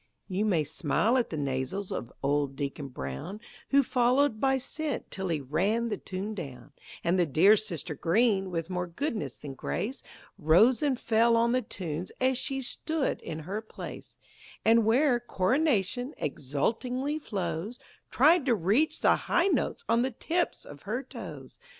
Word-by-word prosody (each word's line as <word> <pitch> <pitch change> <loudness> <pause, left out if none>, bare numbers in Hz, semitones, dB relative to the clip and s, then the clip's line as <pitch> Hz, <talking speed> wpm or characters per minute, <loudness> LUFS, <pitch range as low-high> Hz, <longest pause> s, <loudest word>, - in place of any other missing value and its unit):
You 195 +2 -1
may 175 -7 +2
smile 170 - +1
at 240 - -1
the 160 - -4
nasals 140 +8 -2
of 120 - -4
old 140 0 +1
Deacon 140 0 -4
Brown, 70 - -6 0.3
Who 280 0 +5
followed 250 -1 +2
by 270 +1 +3
scent 290 +2 -3
till 190 -1 -3
he 165 -3 0
ran 195 - 0
the - - -2
tune 195 +3 -5
down; 140 - -8 0.3
And 175 +2 +2
the 175 - +4
dear 175 +9 +6
sister 180 -6 -4
Green, 195 - +2
with 165 -2 -3
more 180 -1 -2
goodness 175 - -3
than 140 -2 -8
grace, 205 - -3 0.4
Rose 200 +11 +5
and 275 -4 +1
fell 230 +1 +3
on 235 +1 +3
the 255 +1 +2
tunes 175 -6 -5
as 255 0 +2
she 270 0 -2
stood 315 +3 -1
in 160 0 -6
her 195 +7 -4
place, 220 - -9 0.5
And 230 0 +5
where 245 +3 +4
"Coronation" 245 - 0
exultingly 235 - -2
flows, 195 - -4 0.3
Tried 305 +2 +4
to 240 - +4
reach 215 - +1
the - - +5
high 360 +3 +1
notes 470 - -1
on 235 - +3
the 260 - +1
tips 335 +8 -2
of 145 0 -11
her 240 +7 -3
toes! 170 - -9
210 Hz, 160 wpm, -29 LUFS, 160-250 Hz, 0.5 s, dear